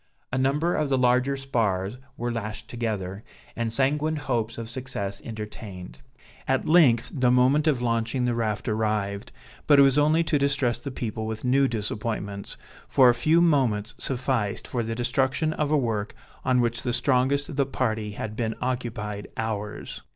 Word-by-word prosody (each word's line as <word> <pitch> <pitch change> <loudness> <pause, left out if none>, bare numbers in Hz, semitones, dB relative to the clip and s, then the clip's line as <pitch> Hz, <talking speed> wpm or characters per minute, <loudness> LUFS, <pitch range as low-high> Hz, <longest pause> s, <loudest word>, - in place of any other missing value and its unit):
A - - +1
number 145 +6 +1
of 150 -2 0
the 135 - +2
larger 125 +2 +2
spars 115 -5 -1 0.2
were 120 +1 -2
lashed 110 -2 -5
together, 105 -4 -4 0.3
and 115 -1 -2
sanguine 145 +5 +1
hopes 120 -6 -2
of 115 -1 -5
success 115 -5 -4
entertained. 105 - -8 0.5
At - - +1
length 150 -9 +5
the 125 -4 +2
moment 130 +5 +4
of 135 -5 +2
launching 115 +2 0
the 120 - +1
raft 110 -3 -2
arrived, 105 -1 -1 0.4
but 145 - +6
it 140 - +8
was 135 +1 +4
only 155 +3 +4
to 155 -2 +1
distress 140 -4 +1
the 130 - -6
people 110 -4 -4
with 110 +2 -5
new 135 +2 +4
disappointments, 105 -3 -4 0.3
for 130 -2 +6
a - - +5
few 155 +8 +3
moments 125 -10 +2
sufficed 125 -5 -1
for 120 - -2
the 115 0 -3
destruction 130 +6 0
of 150 -2 -1
a 155 - +3
work 110 -6 -2 0.3
on 130 -1 +3
which 120 0 0
the 120 - -2
strongest 140 +2 +2
of - - -6
the 140 -2 +2
party 110 -6 -2
had 110 +1 -5
been 110 -1 -2
occupied 115 -5 -3
hours. 105 -2 -4
120 Hz, 170 wpm, -26 LUFS, 110-135 Hz, 0.5 s, it